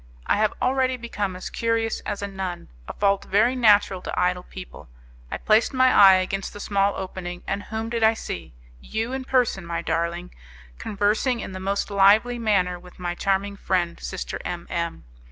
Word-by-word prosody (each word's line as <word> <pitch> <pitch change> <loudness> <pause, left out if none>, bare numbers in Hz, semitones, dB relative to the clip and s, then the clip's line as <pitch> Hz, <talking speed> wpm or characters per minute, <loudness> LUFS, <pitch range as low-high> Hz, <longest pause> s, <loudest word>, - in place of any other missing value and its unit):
I - - +2
have 215 0 +1
already 260 0 +1
become 210 -5 -3
as 185 - -7
curious 230 -1 0
as 200 - -3
a - - -1
nun 190 -3 -5 0.2
a - - -5
fault 200 -1 +1
very 220 +6 +3
natural 205 -6 +4
to - - -4
idle 180 0 +1
people 180 - -11 0.4
I - - -3
placed 220 +4 +2
my 255 0 +5
eye 195 -2 +8
against 190 +1 -2
the 205 - -9
small 200 0 +1
opening, 180 -1 -6
and 200 - -2
whom 225 +1 -4
did 230 -1 -1
I 220 0 +5
see? 85 - -6 0.3
You 225 - -3
in 265 -1 -4
person, 250 -8 +1
my 170 0 -4
darling, 170 +2 -2 0.5
conversing 215 +5 0
in - - -6
the 185 - -6
most 200 +2 -2
lively 210 +5 +4
manner 185 -5 +1
with 180 0 -16
my 175 -1 -3
charming 195 +2 -1
friend, 175 -4 -1
Sister 190 - -5
M 175 -1 -5
M 170 -1 -3
200 Hz, 185 wpm, -24 LUFS, 180-225 Hz, 0.5 s, eye